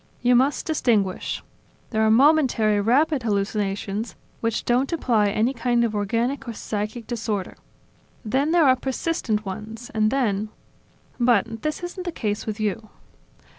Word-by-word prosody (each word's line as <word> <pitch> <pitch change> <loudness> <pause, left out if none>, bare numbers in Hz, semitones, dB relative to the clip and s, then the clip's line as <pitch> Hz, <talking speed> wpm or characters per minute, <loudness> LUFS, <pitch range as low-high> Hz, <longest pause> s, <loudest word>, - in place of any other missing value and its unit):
You 245 0 +5
must 265 +4 +2
distinguish. 220 - 0 0.5
There 220 -2 +1
are 220 - +4
momentary, 240 -5 +4
rapid 275 +6 +2
hallucinations, 205 0 -2 0.2
which 230 -1 -1
don't 250 +5 +1
imply 235 -10 +2
any 220 +5 +1
kind 240 -1 +1
of 230 -2 0
organic 230 +7 -1
or 235 - -4
psychic 215 +2 -4
disorder. 220 -5 -3 0.7
Then 265 +7 +1
there 335 -1 +4
are 260 -1 +6
persistent 260 -5 -2
ones, 215 +5 -7
and 215 -1 +2
then... 215 -5 0 0.7
But, 230 -2 +2
this 305 +3 -3
isn't 360 +1 -6
the 350 - -2
case 210 -8 -3
with 215 0 -3
you." 215 +1 -2
230 Hz, 140 wpm, -24 LUFS, 210-260 Hz, 0.7 s, are